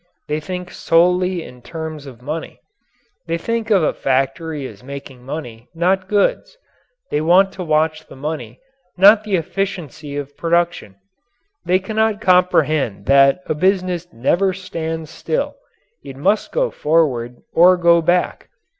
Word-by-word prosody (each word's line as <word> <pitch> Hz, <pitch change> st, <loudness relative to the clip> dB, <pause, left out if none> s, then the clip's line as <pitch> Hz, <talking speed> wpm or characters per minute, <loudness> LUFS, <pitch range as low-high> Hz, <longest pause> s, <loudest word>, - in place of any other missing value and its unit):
They 150 Hz, +1 st, -1 dB
think 180 Hz, +2 st, -6 dB
solely 180 Hz, +1 st, +2 dB
in 125 Hz, 0 st, -13 dB
terms 160 Hz, -1 st, -7 dB
of 125 Hz, -2 st, -12 dB
money. 155 Hz, +4 st, -5 dB, 0.7 s
They 165 Hz, 0 st, -1 dB
think 230 Hz, +5 st, -3 dB
of 195 Hz, -6 st, +4 dB
a -, -, +1 dB
factory 135 Hz, +3 st, -1 dB
as 105 Hz, -4 st, -10 dB
making 135 Hz, -2 st, -9 dB
money, 125 Hz, -5 st, -7 dB
not 185 Hz, +3 st, +1 dB
goods. 355 Hz, -, 0 dB, 0.5 s
They 150 Hz, -, +1 dB
want 185 Hz, +4 st, +4 dB
to 185 Hz, -, -6 dB
watch 155 Hz, 0 st, 0 dB
the -, -, -13 dB
money, 135 Hz, -5 st, -6 dB, 0.4 s
not 205 Hz, +3 st, +7 dB
the 210 Hz, -3 st, 0 dB
efficiency 160 Hz, -5 st, -4 dB
of 145 Hz, 0 st, -6 dB
production. 170 Hz, -, 0 dB, 0.7 s
They 180 Hz, +1 st, +3 dB
cannot 220 Hz, +2 st, 0 dB
comprehend 155 Hz, -, +2 dB
that 140 Hz, +5 st, +4 dB
a -, -, -1 dB
business 180 Hz, +1 st, 0 dB
never 180 Hz, +11 st, +1 dB
stands 160 Hz, -4 st, -5 dB
still, 485 Hz, -, -3 dB, 0.5 s
it 135 Hz, -1 st, -9 dB
must 200 Hz, +9 st, +1 dB
go -, -, 0 dB
forward 130 Hz, -7 st, 0 dB, 0.2 s
or 180 Hz, +2 st, +6 dB
go 170 Hz, -1 st, +4 dB
back. 175 Hz, +2 st, 0 dB
165 Hz, 140 wpm, -19 LUFS, 145-185 Hz, 0.7 s, not